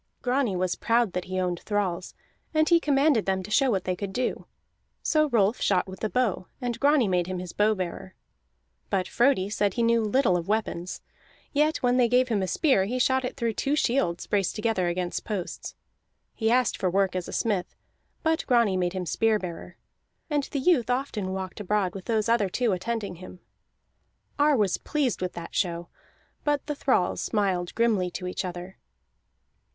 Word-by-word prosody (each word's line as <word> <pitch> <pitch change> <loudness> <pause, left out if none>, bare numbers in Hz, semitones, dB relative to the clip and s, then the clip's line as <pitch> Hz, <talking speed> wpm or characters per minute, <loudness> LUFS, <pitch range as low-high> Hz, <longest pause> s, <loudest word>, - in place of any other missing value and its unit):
Grani 250 -5 +1
was 180 0 0
proud 230 -4 +1
that 180 - -3
he 185 0 -3
owned 180 -2 -1
thralls, 190 -4 -2 0.4
and 310 0 +3
he 340 -1 +6
commanded 280 -7 +2
them 190 -1 0
to 210 - -9
show 270 +4 +4
what 195 -6 0
they 185 - -1
could 195 +1 -5
do. 250 +6 -2 0.6
So 305 -1 +2
Rolf 220 -2 +2
shot 185 -3 +2
with 190 0 -9
the 215 - -2
bow, 220 -7 0
and 245 -3 -3
Grani 285 -5 +4
made 180 -2 +1
him 185 0 -3
his 180 -1 -6
bow 215 +1 +3
bearer. 185 0 -5 0.7
But 190 -2 0
Frodi 240 -6 +2
said 205 -1 0
he 235 - +1
knew 230 0 +3
little 215 -2 +2
of 170 0 -5
weapons; 205 -4 -2 0.5
yet 300 +1 +1
when 245 0 +3
they 245 -2 +4
gave 250 +1 +3
him 215 -4 +1
a 190 - -1
spear 260 - +2
he 245 +5 -2
shot 260 +1 +2
it 255 - -4
through 235 -3 -1
two 280 +6 0
shields 235 - 0
braced 200 -3 0
together 215 -4 0
against 175 0 -2
posts. 200 -5 -5 0.6
He 220 -1 0
asked 250 0 +2
for 185 - 0
work 190 0 +1
as 180 -1 -3
a - - -7
smith, 205 -6 -1 0.5
but 320 0 +1
Grani 235 -6 +3
made 180 -1 0
him 185 -1 -3
spear 220 +5 +2
bearer. 180 -4 -8 0.5
And 295 -1 +2
the - - -5
youth 265 -4 +2
often 245 -7 -1
walked 190 0 -5
abroad 205 -2 0
with 190 -2 -8
those 220 -1 0
other 230 -4 +2
two 240 +4 0
attending 200 0 -3
him. 185 0 -11 1.0
Ar 290 -1 +4
was 205 -4 +1
pleased 280 -10 -1
with 180 -1 -2
that 170 - -8
show, 170 -2 -1 0.5
but 290 -2 0
the 295 - -2
thralls 260 -10 +1
smiled 190 -5 -1
grimly 220 -6 +2
to 180 +1 -6
each 180 - -3
other. 180 +1 -7
210 Hz, 190 wpm, -26 LUFS, 185-250 Hz, 1.0 s, he